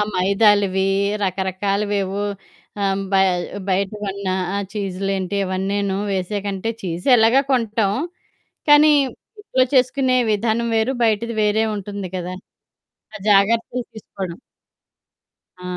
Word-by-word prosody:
మైదాలవి 195 0 +3 0.4
రకరకాలవేవో 195 +1 -1 0.6
ఆహ్, 195 0 0
బయ 190 0 +5 0.4
బయట 190 +1 +1
కొన్న 200 0 -5 0.3
ఆ - - 0 0.2
చీజులేంటి 195 -1 -2
ఇవన్నేను 195 +1 -1 0.2
వేసాకంటే 195 +2 -2
చీజ్ 175 -1 -5
ఎలాగా 230 +5 +5
కొంటాం. 220 -5 +1 0.8
కానీ 300 +1 +7 0.5
ఇంట్లో 260 -11 +1
చేసుకునే 255 0 +3 0.2
విధానం 225 +2 0
వేరు. 220 +4 +1
బయటది 225 +1 0
వేరే 210 +1 +2
ఉంటుంది 200 -1 -6
కదా! 180 0 -4 0.8
ఆ 215 - -6
జాగ్రత్తలు 230 +5 +3
తీసుకోవడం. 190 -4 -7 1.2
ఆ! - - -12
200 Hz, 100 wpm, -20 LUFS, 190-220 Hz, 1.2 s, కానీ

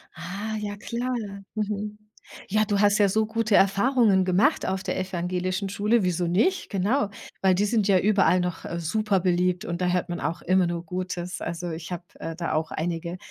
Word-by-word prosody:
Ah. 205 +4 -5
Ja, 205 -1 -4
klar. 240 +4 -3 0.4
Mhm. 210 0 -3 0.5
Ja, 215 +2 +2
du 205 -1 0
hast 205 0 +4
ja 205 -1 +5
so 215 +3 +2
gute 220 -1 +1
Erfahrungen 200 -1 +4
gemacht 185 +2 +2
auf 190 0 -1
der 185 -1 -2
evangelischen 185 +1 -2
Schule. 210 +2 +2
Wieso 180 -1 0
nicht? 345 - +1
Genau, 205 +4 +1 0.3
weil 190 -1 +4
die 205 +3 +2
sind 210 -1 +1
ja 190 -2 +5
überall 195 -2 +3
noch, 180 -2 -3
äh, 170 - -4
super 200 +4 +1
beliebt 180 -1 +1
und 170 +1 -3
da 180 - +2
hört 180 0 0
man 175 - -3
auch 170 - -3
immer 185 0 +3
nur 170 0 -3
Gutes. 180 0 -4
Also, 170 0 -4
ich 160 +2 -7
habe, 175 0 -4 0.2
äh, 165 0 -5
da 170 -2 -2
auch 160 +1 -1
einige, 170 +2 -3
190 Hz, 195 wpm, -25 LUFS, 175-210 Hz, 0.5 s, ja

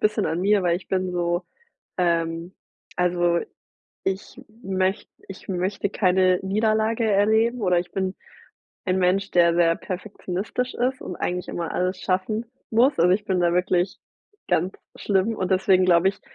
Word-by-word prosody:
bisschen 210 0 +1
an 165 +2 -1
mir, 200 0 +3
weil 170 0 +2
ich 190 - -12
bin 185 -1 -1
so 175 0 -1 0.5
ähm, 170 0 0 0.4
also, 175 -1 +2 0.7
ich 190 +6 -4 0.2
möcht 190 0 -1 0.2
ich 195 - -11
möchte 190 +2 -1
keine 185 -2 +3
Niederlage 220 +3 +1
erleben 220 +3 +2
oder 180 -3 +3
ich 175 - -6
bin 190 -1 -2 0.7
ein 185 -1 +1
Mensch, 190 +2 +1
der 170 -1 +4
sehr 165 -1 +4
perfektionistisch 195 +5 -4
ist 255 +2 -1
und 180 - -6
eigentlich 180 0 -3
immer 170 -1 -4
alles 185 +1 -1
schaffen 205 +5 -1 0.3
muss. 245 +3 +3
Also, 175 +2 +5
ich 200 +3 +2
bin 190 -3 0
da 170 -1 +2
wirklich 180 +1 0 0.5
ganz 180 +4 +1 0.2
schlimm 200 +2 +1
und 185 -3 -2
deswegen 185 0 +4
glaube 180 +1 +4
ich, 195 - -9
185 Hz, 155 wpm, -24 LUFS, 180-205 Hz, 0.7 s, Also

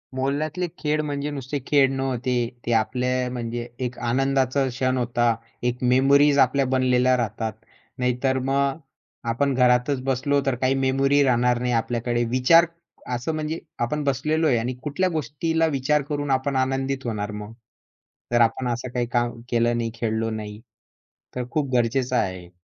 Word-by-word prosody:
मोहल्ल्यातले 145 +6 -1
खेळ 150 0 0
म्हणजे 145 -1 -3
नुसते 140 0 -4
खेळ 140 -2 +4
नव्हते. 130 -2 -1 0.3
ते 120 - -1
आपल्या 125 +3 0
म्हणजे 120 -1 -4 0.2
एक 125 0 -5
आनंदाचा 135 +1 +1
क्षण 130 0 -1
होता. 120 -1 +1 0.3
एक 125 +1 -1
मेमरीज 140 +3 +4
आपल्या 135 +1 +3
बनलेल्या 130 0 +3
राहतात, 115 -1 -2 0.5
नाहीतर 125 +1 +1
मग 135 +2 0 0.5
आपण 140 +4 +1
घरातच 125 +1 +3
बसलो 135 +2 +1
तर 135 -2 +1
काही 130 +2 +1
मेमरी 135 +2 +3
राहणार 125 -1 +2
नाही 125 - 0
आपल्याकडे. 120 +1 0
विचार 130 +8 +5 0.5
असं 125 +7 -3
म्हणजे 155 +1 -3 0.2
आपण 150 +6 -1
बसलेलो 150 +4 +1
आहे 125 -5 +3
आणि 120 +3 -2
कुठल्या 185 +6 0
गोष्टीला 160 +1 -1
विचार 150 +3 +2
करून 145 -1 -2
आपण 135 +1 0
आनंदित 135 +1 -1
होणार 105 -3 -3
मग? 105 +1 -7 0.8
जर 120 - +4
आपण 115 +2 +2
असं 120 +1 -3
काही 125 -1 0
काम 120 -1 0
केलं 120 0 +2
नाही, 115 -1 -2
खेळलो 115 -1 -1
नाही, 105 -1 -6 0.8
तर 125 - -2
खूप 150 -4 -1
गरजेचं 125 +2 +1
आहे. 95 -5 -2
130 Hz, 150 wpm, -24 LUFS, 120-140 Hz, 0.8 s, विचार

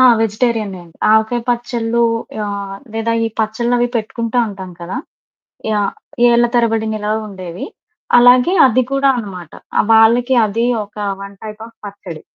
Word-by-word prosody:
ఆ! 255 - +7 0.2
వెజిటేరియనే 215 -3 -1
అండి. 165 - -20 0.2
ఆవకాయ 220 +2 +3
పచ్చలు 235 -1 -1 0.4
ఆహ్, 200 -1 -5 0.2
లేదా 225 +1 -1
ఈ - - 0
పచ్చడ్లు 235 +3 0
అవి 245 0 +1
పెట్టుకుంటావుంటాం 220 -4 -2
కదా! 170 +2 -5 0.8
యాహ్! 205 -2 0 0.4
ఏళ్ళ 240 0 +4
తరబడి 225 -2 +1
నిలవుండేవి. 210 -4 -4 0.5
అలాగే 250 +8 +6
అది 255 +1 +2
కూడా 275 0 +3
అన్నమాట. 185 -7 -7 0.3
ఆహ్, - - +3
వాళ్ళకి 235 +3 +5
అది 230 +3 -1 0.2
ఒక 210 - -29 0.3
వన్ 200 0 -9
టైప్ 215 0 -8
ఆఫ్ 230 - -19
పచ్చడి. 185 -5 -9
220 Hz, 135 wpm, -17 LUFS, 200-235 Hz, 0.8 s, ఆ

